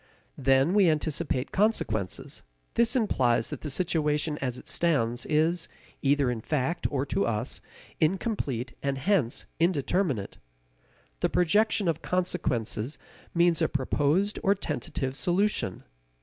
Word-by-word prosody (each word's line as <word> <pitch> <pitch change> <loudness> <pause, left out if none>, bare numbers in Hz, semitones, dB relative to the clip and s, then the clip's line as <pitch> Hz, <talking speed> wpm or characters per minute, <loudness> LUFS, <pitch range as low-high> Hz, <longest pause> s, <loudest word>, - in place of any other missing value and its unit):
Then 135 +5 +3
we 200 -4 +5
anticipate 150 -4 -1
consequences. 110 - -1 0.3
This 235 +2 +2
implies 125 - +2
that - - -5
the 150 - -4
situation 150 -1 0
as 125 -2 -2
it - - -12
stands 120 -8 +1
is, 160 +3 +1 0.3
either 140 -2 +2
in 115 -2 -4
fact 150 +6 -1
or 140 -1 -1
to 195 +7 0
us, 115 +3 -2 0.4
incomplete 155 - -1
and 140 -1 -1
hence 150 - +1
indeterminate. 165 - 0 0.8
The - - +1
projection 200 +3 +2
of 165 -1 0
consequences 145 -9 -1 0.4
means 170 -1 +4
a - - +2
proposed 150 +8 +1
or 200 -1 +3
tentative 145 -8 -3
solution. 180 - 0
150 Hz, 120 wpm, -28 LUFS, 130-180 Hz, 0.8 s, we